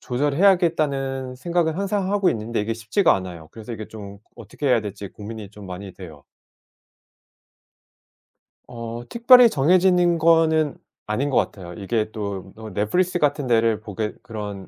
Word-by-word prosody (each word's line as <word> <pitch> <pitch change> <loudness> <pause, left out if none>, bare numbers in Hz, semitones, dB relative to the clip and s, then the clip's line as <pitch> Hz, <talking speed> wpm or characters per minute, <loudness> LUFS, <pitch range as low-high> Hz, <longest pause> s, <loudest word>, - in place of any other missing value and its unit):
조절해야겠다는 140 -3 +1
생각은 170 +2 0
항상 195 0 -1
하고 205 -2 +2
있는데 110 0 -2
이게 110 +2 -2
쉽지가 115 - +2
않아요. 90 -4 -6
그래서 110 +1 -9
이게 110 -1 -7
좀 100 -2 -10 0.2
어떻게 145 - -7
해야 125 -3 +4
될지 100 -1 -7
고민이 105 0 -9
좀 105 -1 -12
많이 95 +1 -8
돼요. 80 -7 -12 2.4
어, 115 -1 -7
특별히 240 0 +7
정해지는 175 +3 +3
거는 160 -2 +3 0.3
아닌 125 +7 -1
것 135 - +1
같아요. 90 -3 -2
이게 110 +4 -2
또 100 -3 -6
어 110 0 -9
넷플릭스 175 - 0
같은 145 -2 0
데를 115 -2 +2
보게 105 0 -4
그런 105 -5 -7
120 Hz, 320 characters per minute, -22 LUFS, 105-165 Hz, 2.4 s, 특별히